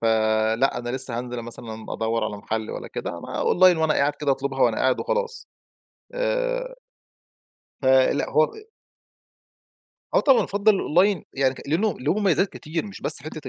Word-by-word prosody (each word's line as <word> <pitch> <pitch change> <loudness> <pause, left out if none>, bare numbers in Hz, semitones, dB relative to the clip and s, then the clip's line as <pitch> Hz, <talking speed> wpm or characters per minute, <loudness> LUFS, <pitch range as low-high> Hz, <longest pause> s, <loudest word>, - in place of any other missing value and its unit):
ف - - -2
آآ 110 0 +2
لأ 135 0 +1
أنا 120 0 -5
لسه 130 -2 -1
هانزِل 125 -1 -5
مثلًا 110 -1 -8
أَدوّر 115 +1 -1
على 105 - -4
محَل 110 +1 -4
والّا - - -7
كده، - - -5
أنا - - -4
online 185 -1 +5
وأنا 160 -1 +2
قاعد 145 +1 +2
كده 145 -1 -2
أطلُبها 135 0 -2
وأنا 115 -2 +3
قاعد 130 -1 +1
وخلاص، 485 0 -3 0.7
آآ - - -1 1.1
فلأ 130 -1 +3
هو 155 +1 +3 1.6
آه - - +5
طبعًا 270 -4 +4
أَفضّل 200 0 +2
Online 185 +3 +2
يعني 135 -1 +1
ك - - -11
لأنه 195 +9 +1
له 145 +6 +1
مميّزات 195 -1 +2
كتير 165 +5 -5
مش 200 - -10
بس - - +4
حِتّة 155 -3 -8
140 Hz, 165 wpm, -24 LUFS, 120-195 Hz, 1.6 s, online